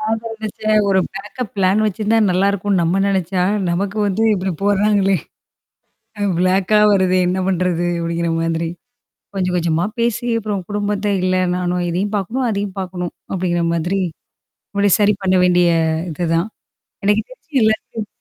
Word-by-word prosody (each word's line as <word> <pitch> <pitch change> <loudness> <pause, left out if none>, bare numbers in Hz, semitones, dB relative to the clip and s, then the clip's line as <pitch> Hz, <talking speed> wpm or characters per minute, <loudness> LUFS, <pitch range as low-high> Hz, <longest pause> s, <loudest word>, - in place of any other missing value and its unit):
நான் 220 +1 0
நெனச்சேன் 215 -1 -1
ஒரு 190 -1 +3 0.2
பேக்கப் 220 +3 -6
பிளான் 195 +2 +3
வச்சிருந்தா 215 +2 +1
நல்லாயிருக்குன்னு 195 0 +1
நம்ம 175 +4 +1
நெனச்சா, 185 -2 0 0.3
நமக்கு 195 +4 -2
வந்து 200 +2 0
இப்பிடி 190 -2 -1
போட்றாங்களே! 200 -1 +3 1.2
பிளாக்கா 190 +3 +3
வருதே 185 -1 +3
என்ன 185 +1 0
பண்றது? 180 -2 0
அப்பிடிங்கிற 170 0 -1
மாதிரி. 165 0 -1 0.7
கொஞ்சம், 185 -2 -1
கொஞ்சமா 170 +1 0
பேசி 235 0 0
அப்புறம் 205 -3 -3
குடும்பத்த 205 0 -2 0.2
இல்ல 185 0 +1 0.2
நானும் 180 0 -1
இதையும் 195 +5 -2
பார்க்கணும், 240 +7 -2
அதையும் 200 -2 -3
பார்க்கணும். 180 -2 -4 0.2
அப்பிடிங்கிற 175 -2 0
மாதிரி. 180 +4 -1 0.8
முடி 200 0 +3
சரி 210 0 +4
பண்ண 185 0 +2
வேண்டிய 175 -1 +4 0.4
இதுதான். 165 +3 0 0.6
எனக்கு 210 +2 +3
தெரிஞ்சு 315 - -3
எல்லாத் 220 0 -1
195 Hz, 130 wpm, -19 LUFS, 180-210 Hz, 1.2 s, சரி